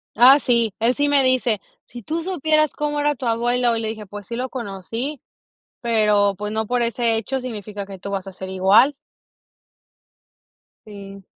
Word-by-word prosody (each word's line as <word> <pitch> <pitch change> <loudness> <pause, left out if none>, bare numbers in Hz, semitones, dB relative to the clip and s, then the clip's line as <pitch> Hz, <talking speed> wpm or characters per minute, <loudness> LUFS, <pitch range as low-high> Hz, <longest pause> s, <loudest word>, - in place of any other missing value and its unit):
Ah, 260 +4 +8
sí, 235 -5 +1
él 230 +3 +3
sí 290 +2 0
me 280 -2 +4
dice: 255 -5 +1 0.3
"Si 240 -2 -11
tú 325 +9 -3
supieras 310 -4 +1
cómo 295 0 -2
era 295 0 +1
tu 255 - -7
abuelo", 240 +1 +1
y - - -2
le 220 - -3
dije: 220 -1 -6
"Pues, 205 0 -10
sí 235 - -5
lo 255 +1 -3
conocí, 230 +5 -5 0.6
pero, 210 -4 +2
pues, 210 0 -5
no 220 0 -1
por 245 +1 0
ese 235 0 +1
hecho 260 +5 -2
significa 210 -5 -6
que 195 -2 -10
tú 200 +1 -6
vas 195 -1 -3
a 195 - -8
ser 190 0 -8
igual". 195 +9 +4 1.9
Sí. 200 -2 -11
230 Hz, 180 wpm, -21 LUFS, 205-260 Hz, 1.9 s, Ah